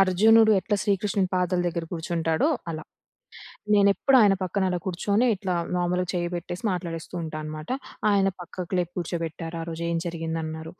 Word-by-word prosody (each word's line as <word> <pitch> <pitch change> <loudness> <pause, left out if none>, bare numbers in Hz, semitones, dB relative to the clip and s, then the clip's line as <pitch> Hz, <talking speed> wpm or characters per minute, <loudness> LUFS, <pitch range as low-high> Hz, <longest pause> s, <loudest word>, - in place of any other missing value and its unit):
అర్జునుడు 220 +4 +6
ఎట్లా 205 +1 0
శ్రీకృష్ణుని 200 -1 +1
పాదాల 180 0 +1
దగ్గర 170 -1 -2
కూర్చుంటాడో 165 - 0 0.2
అలా. 155 -1 -5 0.9
నేనెప్పుడూ 205 +7 +5
ఆయన 205 -2 +6
పక్కన 190 +2 -1
అలా 180 -1 -1
కూర్చొని, 200 +6 +1
ఇట్లా 185 -1 -2 0.2
మామూలుగా 180 0 0
చెయ్యి 175 -1 -1
పెట్టేసి 175 +1 -6
మాట్లాడేస్తూంటా 165 -2 -4
అనమాట. 155 0 -7 0.4
ఆయన 195 -1 +3
పక్కకు 180 +1 -5
లేపి 175 0 -2
కూర్చోబెట్టారు. 165 -1 -4
ఆ - - -3
రోజు, 165 +1 -5
"ఏం 165 - 0
జరిగింది," 165 -1 -3
అన్నారు. 160 +1 -6
175 Hz, 150 wpm, -26 LUFS, 165-195 Hz, 0.9 s, అర్జునుడు